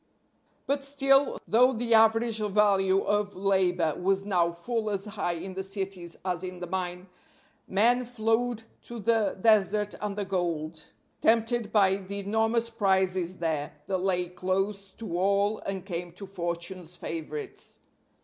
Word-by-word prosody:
But 280 0 0
still, 275 0 +3
though 250 +3 +5
the 235 0 0
average 225 0 +4
value 195 -2 +3
of 205 0 0
labor 185 -4 +2
was 195 +2 0
now 175 -4 +2
full 215 +6 -3
as 200 -1 -2
high 200 -4 -2
in 185 +3 -6
the 190 - -3
cities 190 -3 -5
as 180 -1 -2
in 180 -1 -6
the 180 - -4
mine, 180 0 -3 0.6
men 240 +6 +3
flowed 230 0 0 0.2
to 235 - -7
the 220 -2 +1
desert 210 -1 +3
and 210 -1 -3
the 205 - -1
gold, 165 -4 -2 0.4
tempted 230 0 +2
by 195 -3 +4
the 200 +1 -7
enormous 225 +3 +1
prizes 190 -4 +1
there, 155 -4 -2
that 190 -1 -1
lay 180 -1 0
close 195 +2 -2
to 175 -6 -4
all 200 +2 +2
and 190 -1 -4
came 175 -2 -5
to 195 +3 -9
fortune's 175 -1 -5
favorites. 155 -3 -6
195 Hz, 145 wpm, -28 LUFS, 180-220 Hz, 0.6 s, though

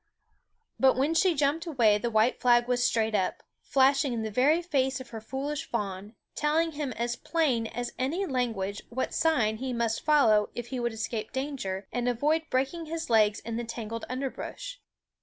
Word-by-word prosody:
But 265 -1 +5
when 280 +5 +2
she 345 +1 +3
jumped 295 +4 0
away 230 -9 +3
the 235 - -1
white 220 +2 +2
flag 240 -1 +4
was 245 0 +1
straight 225 -2 +1
up, 190 -3 -1 0.2
flashing 275 0 +3
in 225 -2 -2
the 220 - -3
very 280 +9 +3
face 265 -5 0
of 260 -1 -10
her 225 -2 -6
foolish 275 +5 -4
fawn, 205 -1 -4 0.2
telling 320 +2 +1
him 290 -3 -3
as 240 +1 -2
plain 265 -10 0
as 245 +2 -5
any 315 +10 0
language 225 - -2
what 260 +2 -3
sign 240 -10 +2
he 255 +2 -3
must 230 -1 -1
follow 230 -9 +4
if 240 0 -5
he 260 - -3
would 240 0 -1
escape 220 0 -4
danger 260 -9 -4
and 245 0 0
avoid 300 +7 0
breaking 275 +6 -1
his 320 -5 -4
legs 215 -2 +4
in 230 0 -4
the 240 - -2
tangled 230 -1 -5
underbrush. 275 - -5
250 Hz, 180 wpm, -28 LUFS, 225-285 Hz, 0.2 s, But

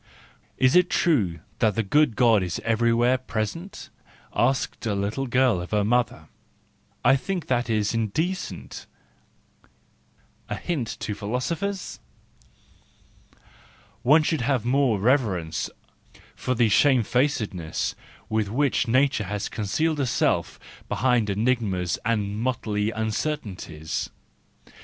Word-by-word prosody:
Is 130 +3 +3
it 180 0 +5
true 100 - +1 0.2
that 110 -3 +2
the 115 - +1
good 145 +3 +3
God 115 -4 +4
is 90 -2 -3
everywhere 115 +2 +3
present? 130 - -5 0.2
" - - -28
asked 135 0 0
a 105 - 0
little 105 +7 -2
girl 125 -6 +2
of 90 - -7
her 105 -1 +1
mother: 120 +3 0 0.4
" - - -30
I - - +7
think 180 +4 -3
that 120 -2 0
is 105 -1 +1
indecent 155 - -3 0.8
" - - -34 0.5
:—a - - -2
hint 150 -10 -2
to 105 - -2
philosophers! 155 - -3 2.0
One 150 +7 +5
should 155 -2 0
have 125 -1 0
more 125 -4 +2
reverence 95 - +1 0.7
for 130 - -2
the 115 -1 +3
shame¬ 125 +2 +4
facedness 110 - -1 0.3
with 110 -2 0
which 130 +2 +1
nature 130 -2 +2
has 105 +2 -3
concealed 150 +9 -1
herself 130 -5 0 0.3
behind 125 -4 +2
enigmas 100 -4 0
and 105 -2 -1
motley 110 -4 -1
uncertainties. 110 - -3
115 Hz, 120 wpm, -25 LUFS, 105-135 Hz, 2.0 s, I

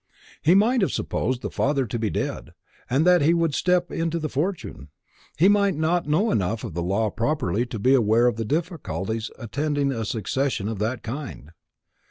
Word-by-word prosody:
"He 170 +4 +4
might 230 +5 +4
have 190 - +1
supposed 125 -1 -2
the - - -4
father 140 -1 +1
to 115 +1 -4
be 110 -1 0
dead, - - -4 0.3
and 135 +6 +2
that 180 -2 +5
he 160 +4 +4
would 165 -3 +1
step 180 +2 +1
into 165 0 -1
the 155 -2 -3
fortune. 170 +7 -3 0.5
He 175 - +5
might 200 -2 +3
not 160 +2 0
know 185 +9 +2
enough 105 +3 -1
of - - -6
the 85 - -2
law 100 +6 0
of 105 - -4
property 120 - 0
to 115 - -5
be 125 +6 +3
aware 115 -2 +4
of 120 - +2
the 115 - -3
difficulties 120 - -3
attending 145 +4 -1
a 115 -4 -3
succession 110 +1 -1
of 110 -3 -4
that 115 +4 -2
kind. 120 - -7
135 Hz, 195 wpm, -24 LUFS, 110-165 Hz, 0.5 s, that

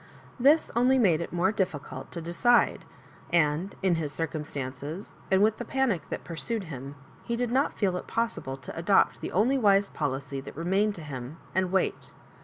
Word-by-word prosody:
This 290 +6 +4
only 250 +3 +4
made 180 -10 +4
it - - -4
the - - -7
more 185 +3 +3
difficult 185 -9 -3
to 170 - -6
de 170 +1 -5
cide; 240 +6 +3 0.5
and 165 +3 +2
in 190 -2 +4
"his 150 -2 -3
circumstances, 150 +1 -5 0.2
and 190 +1 +4
with 220 0 +3
the - - -4
panic 240 - 0
that - - -4
pursued 195 +6 -2
him, 140 -4 -7 0.3
he 235 - -2
did 240 0 -1
not 270 +3 +1
feel 190 -4 +1
it - - -7
possi 230 0 -1
ble 135 0 -5
to 135 - -9
adopt 170 +4 +3
the - - -4
only 250 +8 +3
wise 200 -3 +4
policy 140 -1 -3
that - - -10
remained 195 +5 +1
to 165 - -8
him, 135 0 -7 0.2
and 185 0 +1
wait. 190 - 0
180 Hz, 195 wpm, -28 LUFS, 150-215 Hz, 0.5 s, This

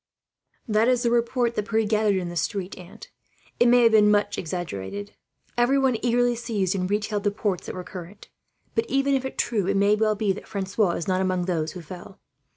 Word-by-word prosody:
"That 215 +1 +2
is 250 -1 +2
the 235 - +2
report 235 0 +1
that 210 -1 -3
Pierre 220 -1 +2
gathered 210 -1 +2
in 180 -2 -2
the 175 - -7
street, 190 +2 -2
aunt. 185 +4 -13 0.5
It 240 - +5
may 245 0 +6
have 230 - +6
been 210 -1 +5 0.2
exaggerated. 175 - -5 0.5
Everyone 265 +1 +3
eagerly 245 0 +2
seized 215 -5 -1
and 185 -2 -2
retailed 205 0 -1
the 205 - +3
reports 200 -2 -3
that - - -5
were 180 - -5
current. 180 +3 -10 0.5
But 225 0 -1
even 275 +1 +2
if 265 -1 -2
true, 210 -6 0
it 195 0 +1
may 200 +1 +4
well 215 0 +1
be 205 -1 0
that 195 - -10
Francois 195 -1 0
is 170 - -4
not 185 0 +1
among 185 -1 0
those 165 -4 -2
who 180 - -8
fell. 180 +4 -11
210 Hz, 200 wpm, -25 LUFS, 185-235 Hz, 0.5 s, may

